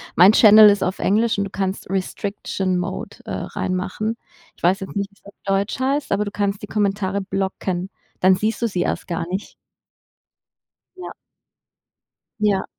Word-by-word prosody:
mein 185 +4 +8
Channel 215 -1 +8
ist 200 -1 +2
auf 185 - -2
Englisch 220 +2 +2
und 200 - +1
du 195 - -6
kannst 190 0 -3
Restriction 190 0 -2
Mode, 180 +2 -5
äh, - - -6
reinmachen. 190 +4 -3 0.4
Ich - - -25
weiß 185 +3 +3
jetzt 190 - -7
nicht, 200 0 -2
wie - - -26
es - - -40
auf 200 - -13
Deutsch 195 +4 0
heißt, 275 +2 0
aber 205 +1 +1
du 205 - -5
kannst 200 -1 -1
die 210 - -7
Kommentare 200 -2 0
blocken. 190 -1 -3 0.3
Dann 185 0 +6
siehst 215 +4 -2
du 235 - +2
sie 180 -3 -2
erst - - -2
gar 170 0 -2
nicht. 190 +3 -5 1.4
Ja. 365 - -7 1.3
Ja. 205 -2 +2
200 Hz, 170 wpm, -21 LUFS, 190-210 Hz, 1.4 s, mein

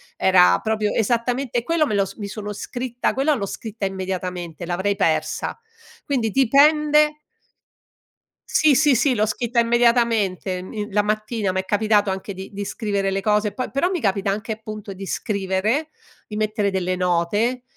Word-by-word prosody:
era 185 -1 +5
proprio 215 -1 -1
esattamente 240 +3 0
e 235 - 0
quello 330 +1 +1
me 210 - -1
lo 200 -1 +2
s - - -9
mi 205 -3 -5
sono 210 0 -6
scritta 245 +3 -3
quella 275 +4 +2
l'ho 210 -8 -2
scritta 215 0 -4
immediatamente, 180 -3 -5
l'avrei 190 +3 0
persa. 185 - -1 0.5
Quindi, 250 -6 0
dipende 300 +5 +4 1.3
Sì, 305 -3 +4
sì, 290 0 +4
sì 260 +3 +3
l'ho 215 -3 +2
scritta 235 +3 -1
immediatamente 230 -6 +2
min 210 +3 -6
la 210 - +4
mattina 215 -1 -1
m'è 190 0 -2
capitato 205 0 +2
anche 190 +1 -5
di 190 +1 -8
di 200 +1 -4
scrivere 200 -1 -2
le 195 - 0
cose, 210 +1 +1
e - - -17
poi 255 - -4
però 275 +7 +1
mi 370 -2 -1
capita 200 -4 0
anche, 215 +3 -3
appunto, 215 -2 -8
di 195 +1 -8
scrivere, 200 +10 -1 0.4
di 210 - -6
mettere 215 -1 0
delle 185 -1 -1
note, 185 +8 0
215 Hz, 165 wpm, -22 LUFS, 195-240 Hz, 1.3 s, era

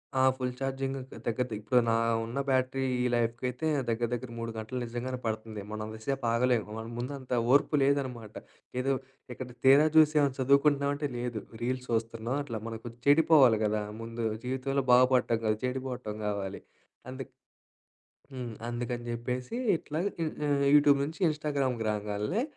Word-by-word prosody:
ఆ! 130 - +3
Full 130 -1 -2
charging 135 0 -2
దగ్గర, 130 +1 -10
దగ్గర 120 +2 0
ఇప్పుడు 110 +4 +3
నా 115 - +3 0.3
ఉన్న 120 +4 -4
బ్యాటరీ 130 0 +1 0.2
ఈ 125 - +1
లైఫ్‌కి 115 +1 -1
అయితే 140 +6 -3 0.2
దగ్గర, 115 +1 0
దగ్గర 120 +1 -4
3 115 0 -4
గంటలు 110 +4 -4
నిజంగానే 120 +2 -4
పడుతంది. 110 -1 -3
మనం 110 0 -4
అంతసేపు 110 +5 -4
ఆగలేము. 120 -2 +2
మన 110 - -5
ముందు 125 +4 -3
అంత 130 -1 -6 0.2
ఓర్పు 145 +2 +4
లేదనమాట. 130 -6 -1 0.5
ఏదో 135 - 0 0.4
ఇక్కడ 130 +1 -7 0.2
తీరా 140 +3 +8
చూసి 155 -1 +7
ఏమన్నా 140 -3 +2
చదువుకుంటున్నామంటే 140 +2 +3
లేదు, 120 -3 -3 0.2
రీల్స్ 125 +1 -2
చూస్తున్నాం. 115 +2 -1
అట్లా 115 -5 -5
మనకు 115 +1 -6 0.2
చెడిపోవాలి 145 -6 +6
గదా! 105 0 0 0.2
ముందు 115 0 -5 0.2
జీవితంలో 130 +2 -1
బాగుపడటం 125 -2 +4
కాదు, 110 0 +2
చెడిపోవటం 125 -4 -4
కావాలి. 100 -2 -3 0.5
అందుకు 130 0 -7 1.0
హ్మ్. 125 -3 -5 0.2
అందుకని 120 0 -3
జెప్పేసి 125 - -3 0.2
ఇట్లాగా 160 +7 -2
ఇ - - +2 0.2
ఆహ్, 140 -1 +2
యూట్యూబ్ 145 -1 +6
నుంచి 155 +5 -7
ఇన్‌స్టాగ్రామ్‌కి 140 -6 -1
రాంగాల్నే, 105 - -1
125 Hz, 150 wpm, -29 LUFS, 115-135 Hz, 1.0 s, తీరా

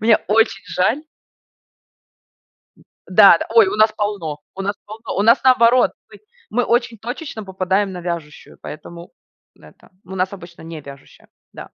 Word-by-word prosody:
Мне 220 0 +5
очень 210 -2 +2
жаль. 220 +11 0 2.1
Да-да, - - +6
ой, 440 -4 +7
у - - -2
нас 215 0 +4
полно, 195 -8 -3 0.2
у 195 - -5
нас 200 +1 -2
полно. 220 +2 -8
У - - +2
нас 230 +2 +4
наоборот, 250 -1 +5 0.2
мы - - -14 0.3
мы 245 +2 0
очень 235 -1 0
точечно 245 0 -7
попадаем 190 +1 -1
на 180 -1 -7
вяжущую, 170 -4 -7
поэтому 170 +3 -10 0.5
н - - -19
это 75 - -20 0.2
у 190 +2 -9
нас 185 +1 -1
обычно 175 -3 -12
не 160 -2 -8
вяжущая, 140 0 -15 0.3
да. - - -9
200 Hz, 155 wpm, -19 LUFS, 175-230 Hz, 2.1 s, ой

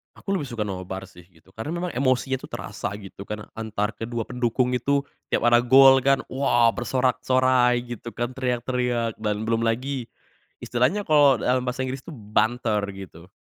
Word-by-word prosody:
Aku 195 - -6
lebih 150 -8 -2
suka 115 -4 -3
nobar 95 -1 -5
sih, 90 -2 -16
gitu. 90 +1 -24
Karena 110 +10 -6
memang 175 0 -3
emosinya 130 0 +1
tuh - - -10
terasa 100 - -5
gitu 100 -1 -10
kan, 105 0 -5
antar 110 -1 -2
kedua 115 +1 -4
pendukung 125 +1 0
itu. 140 +3 +1 0.3
Tiap - - 0
ada 120 0 +6
gol 135 +2 +7
kan, 135 +1 +2
wah 120 -3 +3
bersorak-sorai 125 0 +2
gitu 120 -1 -7
kan, 120 +1 -2
teriak-teriak. 125 -2 -1
Dan 105 0 -2
belum 115 0 0
lagi 125 +2 -2 0.6
istilahnya 130 +13 +1
kalau, 145 -4 +5
eee, - - -5
dalam 125 0 +2
bahasa 130 +1 -2
Inggris 130 +1 -5
itu 165 - -9
banter 110 -1 0 0.2
gitu, 90 -2 -11
120 Hz, 170 wpm, -24 LUFS, 110-130 Hz, 0.6 s, gol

